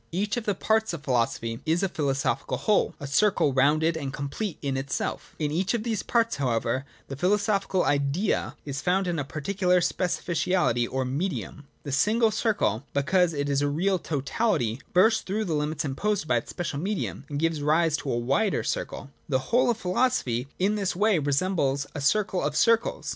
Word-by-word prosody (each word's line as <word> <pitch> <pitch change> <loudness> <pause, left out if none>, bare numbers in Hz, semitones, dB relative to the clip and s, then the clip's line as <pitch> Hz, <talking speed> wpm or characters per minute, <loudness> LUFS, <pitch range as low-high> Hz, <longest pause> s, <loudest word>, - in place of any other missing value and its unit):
J 170 - -4
Each 205 +1 0
of 240 -2 -3
the 205 - +1
parts 220 +1 +1
of 160 -3 -6
philosophy 115 -3 -1
is 165 +4 +1
a - - +3
philoso 140 -6 0
phical - - -5
whole, 210 -2 +1
a 145 - -6
circle 145 0 +2
rounded 155 +5 +3
and 140 -4 -4
complete 145 +8 -4
in 135 -1 -1
itself 135 0 -3
In 150 -2 -1
each 185 +8 0
of 220 - -2
these 225 -3 -1
parts, 230 -5 +1
however, 125 0 0 0.2
the 135 - -6
philosophical 195 +3 +1
Idea 145 +8 0
is 140 -1 -4
found 190 +2 +1
in 175 -3 -1
a - - -1
particular 180 +6 0
specificality 175 -7 0
or 130 0 -1
medium. 145 +1 -3 0.2
The 145 - -5
single 215 - +3
circle, 200 - 0
because 170 +5 +3
it 145 -1 -2
is 140 0 +1
a 145 - +2
real 180 +6 +1
totality, 140 - -1
bursts 220 +5 +4
through 210 +3 -2
the 170 - -2
limits 150 +1 -1
imposed 170 +6 -1
by 125 - +3
its 115 - -4
special 170 -5 -4
medium, 195 +4 -3
and 145 - -3
gives 165 0 0
rise 155 +1 +2
to 140 - -4
a 120 - 0
wider 140 - +1
circle. 140 - -4 0.2
The 130 -2 -1
whole 245 +1 +4
of 235 - +1
philosophy 180 - 0
in 195 +3 +2
this 195 -3 -1
way 205 -1 +3
resembles 140 -1 0
a 145 - -5
circle 190 +5 +1
of 150 0 -1
circles. 230 +5 +2
160 Hz, 190 wpm, -26 LUFS, 140-195 Hz, 0.2 s, bursts